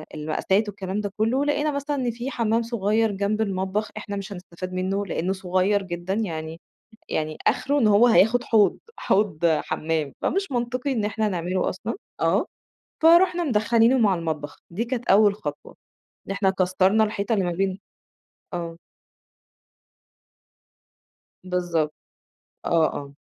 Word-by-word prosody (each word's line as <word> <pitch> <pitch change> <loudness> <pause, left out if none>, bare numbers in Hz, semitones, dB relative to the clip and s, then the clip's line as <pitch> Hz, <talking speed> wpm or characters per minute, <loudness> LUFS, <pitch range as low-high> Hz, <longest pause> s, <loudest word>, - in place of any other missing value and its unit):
المقاسات 190 +7 0
والكلام 195 +1 -4
ده 205 -1 -4
كلّه، 250 +6 +1
لقينا 295 +1 +1
مثلًا 285 +1 -2
إن 250 -3 -1
في 240 +4 -5
حمام 230 0 +1
صغيّر 220 -1 +1
جنب 200 +2 -1
المطبخ، 195 +1 -1
إحنا 205 -1 -5
مش 200 0 -5
هنسْتَفاد 185 0 -8
منه 195 +2 -1
لأنه 185 +1 -1
صغيّر 190 +2 +1
جدًا، 175 +1 -4
يعني 165 -6 -3 0.5
يعني 155 0 -2
آخره 285 +1 +2
إن 230 - +3
هو 210 +3 +6
هياخد 235 +2 +4
حوض، 215 -3 +3 0.2
حوض 190 -5 +1
حمام، 155 -1 -1
فمش 390 -4 0
منطقي 250 +3 -1
إن 220 -4 -1
إحنا 215 0 0
نعمله 180 0 -1
أصلًا، 205 +5 -4 0.3
آه، - - +2 0.6
فرُحنا 345 +1 +5
مدخَّلينه 230 0 +3
مع 205 -5 +4
المطبخ، 155 -4 -4
دي 210 +8 -2
كانت 245 0 -4
أول 205 +1 +6
خطوة، 145 -7 -7 0.5
إن - - -4
إحنا 195 -1 +1
كسّرْنا 190 +3 +2
الحيطة 210 +1 -1
اللي 195 -4 +1
ما 175 - -1
بين 190 +2 -1 0.8
آه. 170 -1 -4 2.7
بالضبط، 175 -4 -1 0.7
آه 165 -2 +3
آه. 140 -1 -7
200 Hz, 140 wpm, -24 LUFS, 180-225 Hz, 2.7 s, هو